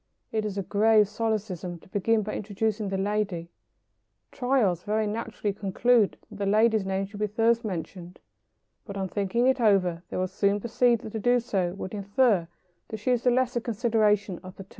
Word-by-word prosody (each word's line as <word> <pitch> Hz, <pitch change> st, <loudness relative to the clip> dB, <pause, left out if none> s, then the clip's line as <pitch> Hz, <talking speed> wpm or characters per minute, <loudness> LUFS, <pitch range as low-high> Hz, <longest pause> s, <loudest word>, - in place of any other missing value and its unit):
It 220 Hz, -1 st, -1 dB
is 205 Hz, -2 st, -4 dB
a 195 Hz, -, -1 dB
grave 210 Hz, +2 st, +4 dB
solecism 210 Hz, -5 st, -3 dB
to -, -, -19 dB
begin 215 Hz, +3 st, +1 dB
by 210 Hz, -, -4 dB
introducing 210 Hz, 0 st, -2 dB
the 195 Hz, -, -2 dB
lady. 195 Hz, -4 st, -2 dB, 0.8 s
Tyros 245 Hz, -10 st, +1 dB
very 215 Hz, +2 st, 0 dB
naturally 210 Hz, -1 st, -3 dB
conclude 210 Hz, +3 st, +2 dB
that -, -, -10 dB
the 200 Hz, -, -1 dB
lady's 215 Hz, -1 st, +3 dB
name 195 Hz, 0 st, -1 dB
should 205 Hz, +1 st, -11 dB
be 210 Hz, -, +1 dB
first 230 Hz, +3 st, +2 dB
mentioned; 180 Hz, -2 st, -6 dB, 0.7 s
but 200 Hz, -1 st, -8 dB
on 190 Hz, -1 st, -2 dB
thinking 205 Hz, +5 st, 0 dB
it 260 Hz, -1 st, +2 dB
over 185 Hz, -6 st, +3 dB
they -, -, -4 dB
will 185 Hz, 0 st, 0 dB
soon 200 Hz, +2 st, +1 dB
perceive 235 Hz, +1 st, +2 dB
that 220 Hz, -, -7 dB
to 220 Hz, -, -3 dB
do 245 Hz, +3 st, +3 dB
so 195 Hz, -7 st, -1 dB
would 195 Hz, 0 st, -6 dB
infer 200 Hz, -2 st, +2 dB, 0.4 s
that 220 Hz, -, -6 dB
she 215 Hz, +4 st, -1 dB
is 245 Hz, -2 st, +2 dB
the 250 Hz, -, +4 dB
lesser 245 Hz, -1 st, +1 dB
consideration 215 Hz, -4 st, +1 dB
of 185 Hz, 0 st, -11 dB
the 195 Hz, -, -9 dB
two. 190 Hz, -, -28 dB
210 Hz, 190 wpm, -27 LUFS, 195-225 Hz, 0.8 s, grave